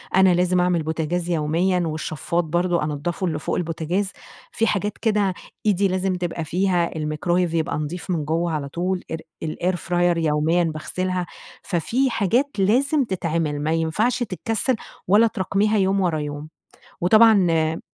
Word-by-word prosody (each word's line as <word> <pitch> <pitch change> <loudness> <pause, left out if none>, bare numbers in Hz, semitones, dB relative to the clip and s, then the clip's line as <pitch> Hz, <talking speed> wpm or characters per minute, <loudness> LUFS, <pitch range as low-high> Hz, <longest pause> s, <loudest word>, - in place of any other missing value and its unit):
أنا 190 -1 +6
لازم 180 +1 +2
أعمل 180 -1 +2
البوتجاز 160 +2 -2
يوميًا، 170 +3 +1
والشفاط 155 +2 -2
برضه 175 +1 0
أنضّفه 155 +5 -2
اللي 155 -3 -2
فوق - - -2
البوتجاز، 175 +4 -2 0.4
في 225 - 0
حاجات 205 0 -1
كده 210 -4 +1 0.3
إيدي 200 -1 +3
لازم 185 0 0
تبقى 175 -2 -3
فيها، 175 0 0
الميكرويف 165 +3 0
يبقى 165 -1 0
نظيف 160 +4 -5
من 160 -4 -1
جوّه 165 +3 0
على 145 -3 -3
طول، 180 +4 -2
إر 160 - -1 0.3
الair 175 +4 -1
fryer 175 0 +1
يوميًا 160 +2 +2
باغسلها. 180 +3 -2 0.4
ففي 240 - 0
حاجات 235 +5 +1
لازم 270 +9 +3
تتعمل، 165 - -2
ما 155 - 0
ينفعش 165 +10 +1
تتكسّل، 225 +3 -1 0.3
ولا 210 +5 +5
تراكميها 210 +1 0
يوم 195 0 +2
ورا 170 -4 +1
يوم، 145 +1 -5 0.5
وطبعًا 215 +1 +6
آآ 160 0 +1
175 Hz, 145 wpm, -22 LUFS, 160-195 Hz, 0.5 s, أنا